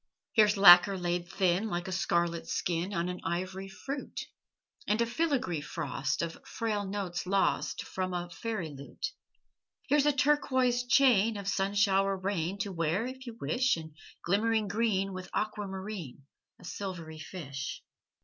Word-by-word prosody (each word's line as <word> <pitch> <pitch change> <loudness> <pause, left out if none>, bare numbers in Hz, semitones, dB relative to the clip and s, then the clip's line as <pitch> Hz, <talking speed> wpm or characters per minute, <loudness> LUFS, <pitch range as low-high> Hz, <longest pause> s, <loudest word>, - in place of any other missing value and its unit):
Here's 210 -1 +5
lacquer 190 0 +9
laid 175 -1 -1
thin, 190 +3 +1
Like 175 -2 -3
a - - -4
scarlet 170 -2 0
skin 175 +2 -1
On 170 -3 -1
an 180 0 -5
ivory 185 +3 -3
fruit; 270 +8 -6 0.7
And 210 - +2
a 235 - +3
filigree 245 - 0
frost 145 -1 -2
Of 165 -1 -6
frail 215 -3 -2
notes 190 -3 -3
lost 195 +1 +1
From 185 0 -3
a 175 0 -3
fairy 205 -3 -4
lute. 140 0 -6 0.8
Here's 295 +1 +4
a - - +6
turquoise 260 -3 +2
chain 230 -5 +4
Of 200 -1 -6
sun 200 0 0
shower 195 -1 +3
rain 185 -1 -2
To 200 - -3
wear 170 +5 0
if 260 0 -7
you 230 -1 -7
wish; 255 -5 +1
And 160 -2 -9 0.3
glimmering 215 +3 +2
green 195 -2 0
With 185 0 -7
aquamarine, 195 -8 -4 0.4
A - - -16
silvery 170 -5 -6
fish. 140 -5 -6
195 Hz, 150 wpm, -30 LUFS, 175-220 Hz, 0.8 s, lacquer